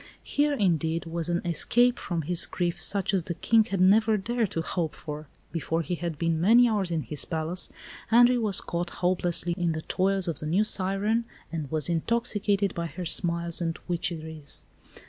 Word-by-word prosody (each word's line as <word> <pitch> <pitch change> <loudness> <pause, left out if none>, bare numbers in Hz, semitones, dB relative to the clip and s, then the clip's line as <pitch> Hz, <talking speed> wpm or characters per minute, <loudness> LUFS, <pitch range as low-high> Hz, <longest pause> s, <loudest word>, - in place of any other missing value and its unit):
Here, 290 +1 +1
indeed, 165 - 0
was 165 0 -4
an 175 0 0
escape 240 +9 +3
from 170 -4 -3
his 175 +3 0
grief 175 -1 -2
such 200 +1 +1
as 185 -4 +1
the 170 - -4
King 225 +4 +3
had 195 -4 -3
never 215 +4 +5
dared 230 +1 -1
to 165 - -3
hope 165 -2 -2
for. 150 0 -7 0.2
Before 165 +1 -1
he 180 - -3
had 170 -2 -3
been 165 0 0
many 235 +6 +6
hours 205 -5 0
in 165 -3 -1
his 140 +5 -2
palace, 165 +2 -2 0.4
Henri 245 +2 +6
was 210 -4 0
caught 175 0 -3 0.2
hopelessly 175 -1 +1
in 170 -2 +1
the 160 0 -5
toils 195 0 +1
of 165 -4 -2
the 155 - -3
new 185 +7 +3
siren, 205 +3 +1 0.3
and 155 -4 -4
was 155 -1 -1
intoxicated 205 +2 0
by 170 0 -3
her 170 +3 -7
smiles 170 0 +1
and 165 -1 -1
witcheries. 160 -4 -3
175 Hz, 185 wpm, -27 LUFS, 165-200 Hz, 0.4 s, many